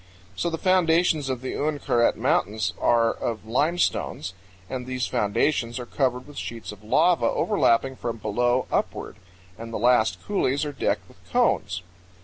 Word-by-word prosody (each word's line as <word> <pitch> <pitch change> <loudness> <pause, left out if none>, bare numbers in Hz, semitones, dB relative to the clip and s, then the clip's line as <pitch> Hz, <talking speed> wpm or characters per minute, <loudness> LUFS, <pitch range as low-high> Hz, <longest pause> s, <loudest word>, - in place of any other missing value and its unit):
So 170 - -1
the 165 - -3
foundations 165 -5 +3
of 130 -2 -2
the 130 - -4
Uinkaret 145 -5 +1
Mountains 105 -1 0
are 115 -1 +3
of 110 -2 -4
limestones, 135 - 0 0.3
and 125 +2 -5
these 130 -1 -1
foundations 115 +3 0
are 125 - -5
covered 125 0 -1
with 145 -1 -9
sheets 115 -2 -6
of 105 0 -13
lava 170 +11 +3
overlapping 130 - +2
from 115 -1 -4
below 120 +4 +1
upward, - - -2 0.4
and 115 0 -7
the - - -2
last 120 -1 +3
coulees 145 -8 0
are 145 - -4
decked - - -1
with - - -20
cones. - - +1
125 Hz, 150 wpm, -25 LUFS, 115-150 Hz, 0.4 s, foundations